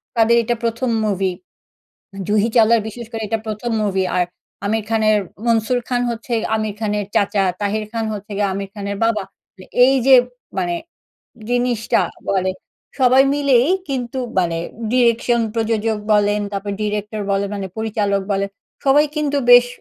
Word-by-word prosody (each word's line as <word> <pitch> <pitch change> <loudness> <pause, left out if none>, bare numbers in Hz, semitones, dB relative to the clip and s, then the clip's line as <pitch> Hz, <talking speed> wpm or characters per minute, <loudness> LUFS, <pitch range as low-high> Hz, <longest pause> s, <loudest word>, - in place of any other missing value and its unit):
তাদের 230 +1 +4
এটা 240 +2 0
১ম 235 +2 -1 0.2
মুভি। 195 -2 0 1.0
জুহি 210 +2 +2
চাওলার 230 0 +5
বিশেষ 235 +1 -8
করে 225 -1 -4
এটা 225 - 0
১ম 220 +2 -3
মুভি 190 -2 0
আর 180 - +3 0.4
আমির 220 0 0
খানের, 215 -1 +3 0.3
মনসুর 230 +1 +2
খান 245 -1 0
হচ্ছে 235 +1 -6 0.2
আমির 215 -1 -2
খানের 210 -2 -1
চাচা, 205 0 +2 0.2
তাহির 210 +1 -1
খান 225 -1 -2
হচ্ছে 205 0 -7
গিয়ে 205 -1 +2
আমির 195 0 -5
খানের 200 -1 -4
বাবা। 225 -3 +1 0.3
তো 185 - -13 0.2
এই 270 +1 +4
যে 270 - +8 0.4
মানে 175 -2 0 0.8
জিনিসটা 245 -2 +1 0.3
বলে। 190 -1 +1 0.5
সবাই 260 +1 +6
মিলেই 275 -3 +3 0.2
কিন্তু 255 -1 -3 0.2
মানে 170 -2 +1 0.4
direction 235 -1 +3
প্রযোজক 225 -1 0
বলেন, 205 0 +3
তারপর 200 0 -3
ডিরেক্টর 210 0 -3
বলেন 200 0 0
মানে 195 -1 -4
পরিচালক 205 -3 0
বলেন। 200 0 0 0.4
সবাই 285 +2 +5
কিন্তু 290 -1 0
বেশ 245 0 +9
220 Hz, 150 wpm, -19 LUFS, 200-235 Hz, 1.0 s, বেশ